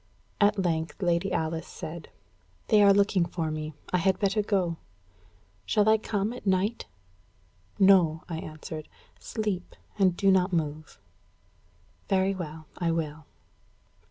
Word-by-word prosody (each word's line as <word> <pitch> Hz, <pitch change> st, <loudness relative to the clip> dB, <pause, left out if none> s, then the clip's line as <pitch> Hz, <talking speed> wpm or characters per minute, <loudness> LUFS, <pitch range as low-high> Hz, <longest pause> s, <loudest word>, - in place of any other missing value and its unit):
At 210 Hz, 0 st, +4 dB
length 165 Hz, 0 st, -1 dB
Lady 175 Hz, +2 st, +1 dB
Alice 160 Hz, 0 st, -2 dB
said: 160 Hz, +1 st, -8 dB, 0.6 s
"They 215 Hz, -2 st, +6 dB
are 200 Hz, -1 st, +7 dB
looking 200 Hz, -2 st, +3 dB
for 165 Hz, -2 st, -3 dB
me; 155 Hz, -1 st, -5 dB, 0.2 s
I 180 Hz, -, +3 dB
had 190 Hz, +2 st, +2 dB
better 200 Hz, +1 st, +1 dB
go. 190 Hz, -5 st, 0 dB, 0.9 s
Shall 210 Hz, -, +2 dB
I 220 Hz, 0 st, +5 dB
come 210 Hz, +1 st, -2 dB
at 245 Hz, -4 st, -9 dB
night?" 190 Hz, +4 st, 0 dB, 0.9 s
"No," 180 Hz, -5 st, +5 dB
I 165 Hz, -2 st, -4 dB
answered. 155 Hz, 0 st, -8 dB, 0.3 s
"Sleep, 210 Hz, -5 st, -4 dB, 0.2 s
and 185 Hz, -3 st, +3 dB
do 195 Hz, -1 st, +4 dB
not 185 Hz, 0 st, +3 dB
move." 155 Hz, -2 st, -3 dB, 1.1 s
"Very 195 Hz, 0 st, +2 dB
well, 160 Hz, -4 st, -7 dB
I 170 Hz, -2 st, 0 dB
will." 155 Hz, -2 st, -3 dB
180 Hz, 130 wpm, -27 LUFS, 160-200 Hz, 1.1 s, are